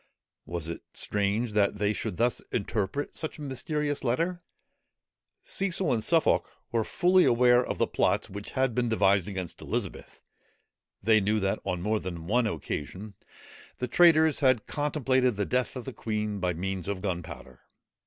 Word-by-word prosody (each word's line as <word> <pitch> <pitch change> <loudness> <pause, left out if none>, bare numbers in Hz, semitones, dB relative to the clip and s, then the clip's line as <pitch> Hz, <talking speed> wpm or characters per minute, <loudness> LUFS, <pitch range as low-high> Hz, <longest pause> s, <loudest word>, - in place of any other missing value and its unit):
Was 85 -2 -4
it 85 - -5
strange 105 +3 0
that 105 -1 +2
they 105 +1 +1
should 90 - -4
thus 120 +1 +1
interpret 110 +4 -2
such 155 - -4
a 150 - -8
mysterious 145 +2 -2
letter? 165 +9 0 1.0
Cecil 190 -6 0
and 110 -2 -1
Suffolk 165 -2 +2 0.2
were 115 -1 +1
fully 185 - +3
aware 120 +1 +5
of - - -4
the - - +3
plots - - +1
which 100 +1 -7
had 130 -2 +2
been 120 0 0
devised 100 -4 +3
against 95 -4 -6
Elizabeth; - - -5 0.8
they 110 +1 +5
knew 105 +2 +1
that 95 0 0
on 90 -1 -2
more 110 +1 +1
than 85 -4 -6
one 115 +5 +2
occasion, 95 +3 -5 0.6
the 125 - -2
traitors 160 +1 +5
had 130 -6 +3
contemplated 130 -5 +1
the 100 0 -1
death 125 +10 -1
of 125 - -6
the 130 - -6
queen 105 -2 -3
by 90 -1 0
means 95 +1 -3
of 100 -1 -3
gunpowder. 85 -9 -5
110 Hz, 160 wpm, -28 LUFS, 100-130 Hz, 1.0 s, aware